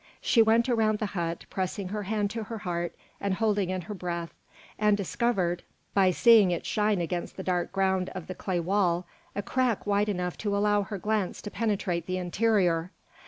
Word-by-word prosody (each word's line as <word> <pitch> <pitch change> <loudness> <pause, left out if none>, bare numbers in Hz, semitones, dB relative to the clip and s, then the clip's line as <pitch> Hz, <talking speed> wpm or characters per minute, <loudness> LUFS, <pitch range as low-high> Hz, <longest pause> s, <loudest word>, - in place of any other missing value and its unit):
She 230 - +4
went 225 +2 +4
around 220 -3 +2
the 215 - -2
hut, 170 -2 -3
pressing 190 0 -2
her 210 +1 -3
hand 205 0 -1
to 225 -1 -4
her 225 +2 -5
heart 175 -3 -3 0.2
and 200 -1 0
holding 205 -3 +1
in 185 0 -2
her 195 +5 -7
breath, 170 -3 -4 0.5
and 210 -1 +4
discovered, 190 -3 0 0.3
by 195 -2 +5
seeing 215 +1 +6
it 175 - -2
shine 210 -2 +1
against 175 +1 -3
the 190 - -4
dark 180 -2 -1
ground 190 -1 +1
of 185 -3 -5
the 185 - -5
clay 185 -1 -2
wall, 180 -1 +1 0.3
a 205 - -2
crack 250 -1 0
wide 205 +1 +2
enough 180 -3 -2
to 205 -2 0
allow 205 0 +3
her 200 +1 -5
glance 210 -1 -1
to 205 - -6
penetrate 195 -7 -1
the 185 0 -1
interior. 180 -2 +1
195 Hz, 190 wpm, -28 LUFS, 180-210 Hz, 0.5 s, seeing